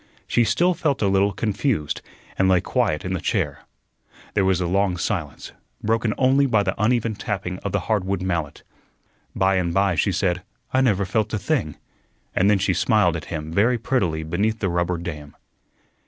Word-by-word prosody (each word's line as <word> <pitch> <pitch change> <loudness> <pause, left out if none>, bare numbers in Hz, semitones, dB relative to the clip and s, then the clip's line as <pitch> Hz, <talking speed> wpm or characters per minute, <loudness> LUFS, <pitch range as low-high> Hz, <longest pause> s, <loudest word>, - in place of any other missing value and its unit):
She 120 - +2
still 145 - +2
felt 150 -8 -1
a - - +3
little 100 +1 +3
confused, 105 - -1 0.3
and 95 0 +2
lay 90 -1 +5
quiet 95 -5 0
in 95 - -2
the 90 - -2
chair. - - -1 0.7
There 100 - +2
was 95 -1 +2
a 90 - -1
long 95 +1 +1
silence, 85 -7 -3 0.3
broken 110 0 +1
only 135 +2 +4
by 110 -5 +2
the - - 0
uneven 115 0 +2
tapping 95 -3 -4
of 100 - -4
the 100 - 0
hardwood 100 -3 -1
mallet. 85 -6 -3 0.7
By 95 0 +2
and 90 -2 0
by 95 -1 +3
she 100 +4 +1
said, 90 -1 0 0.3
"I 130 - +4
never 100 -7 +2
felt 110 +3 0
a - - 0
thing," 105 - -1 0.6
and 95 +2 +3
then 105 - +4
she 95 - +1
smiled 105 -7 +2
at 80 - -5
him 80 -1 -5
very 115 +7 +3
prettily 95 -10 0
beneath 100 +8 0
the 100 -4 -1
rubber 85 0 0
dam. 75 -4 -7
100 Hz, 185 wpm, -23 LUFS, 90-110 Hz, 0.7 s, lay